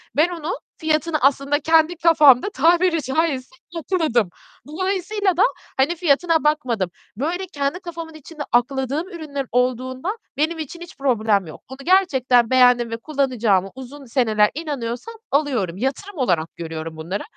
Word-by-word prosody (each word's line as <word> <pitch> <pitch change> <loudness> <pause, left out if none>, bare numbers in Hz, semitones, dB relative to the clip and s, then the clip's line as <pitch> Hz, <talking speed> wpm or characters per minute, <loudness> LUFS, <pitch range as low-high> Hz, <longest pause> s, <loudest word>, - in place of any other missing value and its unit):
Ben 315 +4 +4
onu, 335 -1 -4 0.3
fiyatını 315 0 0
aslında 275 +2 +2
kendi 320 +2 +3
kafamda 310 -1 +5
tabiri 340 +2 +3
caizse, 265 -2 -1 0.2
yatırdım. 310 - 0 0.4
Dolayısıyla 375 +3 -1
da, - - +5 0.3
hani, 290 +6 +2
fiyatına 330 0 +2
bakmadım. 255 - 0 0.3
Böyle 345 +8 -2
kendi 285 +5 -1
kafamın 335 -3 -8
içinde 310 0 -11
akladığım 265 +6 0
ürünlerim 295 -6 -5
olduğunda 255 - -1 0.2
benim 320 +2 0
için 330 +3 -7
hiç 345 - -11
problem 220 -8 +1
yok. 155 - -11
Bunu 265 - -9
gerçekten 265 -11 +3
beğendim 245 -2 +4
ve 230 - -2
kullanacağıma 230 -8 0
uzun 265 +2 -10
seneler 220 -4 +2
inanıyorsam, 290 - -5 0.2
alıyorum. 250 - 0
Yatırım 285 - -3
olarak 175 - 0
görüyorum 160 -1 -6
bunları, 175 +6 -4
280 Hz, 135 wpm, -21 LUFS, 245-330 Hz, 0.4 s, kafamda